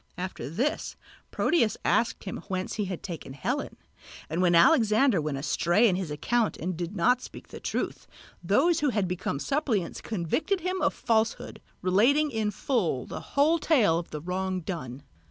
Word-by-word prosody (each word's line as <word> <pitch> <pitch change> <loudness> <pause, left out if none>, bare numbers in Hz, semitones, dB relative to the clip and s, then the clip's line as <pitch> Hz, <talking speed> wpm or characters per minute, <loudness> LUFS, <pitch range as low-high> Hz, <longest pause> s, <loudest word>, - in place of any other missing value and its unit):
After 180 -8 -5
this 245 - -2 0.3
Proteus 235 -11 +1
asked 235 - +1
him 190 - -5
whence 185 -1 -3
he 210 - -1
had 185 -2 -5
taken 165 -7 -7
Helen; 135 - -3 0.5
and 165 +3 0
when 175 -2 +4
Alexander 220 - +5
went 150 -2 -2
astray 170 +9 +2
in 190 - +2
his 185 -3 -3
account 215 +10 0
and 180 +2 -3
did 175 +4 -5
not 245 +8 +3
speak - - -11
the - - -9
truth, - - -3 0.4
those 340 -1 +3
who 295 - +2
had 205 -6 0
become 180 -5 -2
suppliants 230 - -1
convicted 230 - -1
him 370 +2 -2
of - - +1
falsehood, 225 -1 -1 0.2
relating 250 +12 +3
in 220 -3 0
full 200 - -1
the - - -6 0.2
whole 315 +4 +4
tale 215 - +3
of 170 - -8
the 150 - -6
wrong 185 +2 -2
done. 145 -7 -6
195 Hz, 170 wpm, -27 LUFS, 170-245 Hz, 0.5 s, Alexander